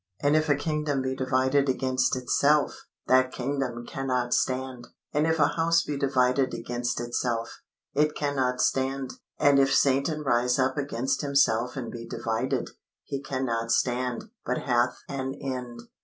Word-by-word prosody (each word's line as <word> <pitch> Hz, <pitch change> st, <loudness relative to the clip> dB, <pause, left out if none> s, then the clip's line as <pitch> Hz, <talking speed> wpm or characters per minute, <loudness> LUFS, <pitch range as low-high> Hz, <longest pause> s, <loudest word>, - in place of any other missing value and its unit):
And 145 Hz, +1 st, +2 dB
if 155 Hz, 0 st, +2 dB
a 145 Hz, -, +5 dB
kingdom 150 Hz, -2 st, -1 dB
be 130 Hz, 0 st, -2 dB
divided 130 Hz, +1 st, +1 dB
against 130 Hz, 0 st, +1 dB
itself, 140 Hz, +3 st, +1 dB, 0.2 s
that 130 Hz, 0 st, +4 dB
kingdom 130 Hz, -2 st, -3 dB
cannot 125 Hz, -3 st, -1 dB
stand. 130 Hz, -1 st, -1 dB, 0.3 s
And 150 Hz, +2 st, +2 dB
if 160 Hz, 0 st, +2 dB
a 150 Hz, -, +4 dB
house 165 Hz, 0 st, +2 dB
be 150 Hz, -, -3 dB
divided 130 Hz, -1 st, +1 dB
against 120 Hz, +1 st, -3 dB
itself, 120 Hz, -1 st, -2 dB, 0.3 s
it 150 Hz, +1 st, +2 dB
cannot 135 Hz, -3 st, 0 dB
stand. 135 Hz, 0 st, 0 dB, 0.2 s
And 140 Hz, -1 st, +5 dB
if 135 Hz, 0 st, +3 dB
Satan 140 Hz, +3 st, +2 dB
rise 125 Hz, -3 st, +2 dB
up 130 Hz, 0 st, +1 dB
against 135 Hz, -3 st, -1 dB
himself 135 Hz, -4 st, +2 dB
and 120 Hz, -3 st, -4 dB
be 115 Hz, -1 st, -8 dB
divided, 115 Hz, +2 st, -2 dB, 0.3 s
he 140 Hz, -, -4 dB
cannot 120 Hz, -4 st, -2 dB
stand, 125 Hz, -1 st, 0 dB, 0.2 s
but 125 Hz, -, -2 dB
hath 120 Hz, -1 st, +1 dB
an 135 Hz, -1 st, -4 dB
end. 125 Hz, -3 st, -5 dB
130 Hz, 150 wpm, -27 LUFS, 125-140 Hz, 0.3 s, a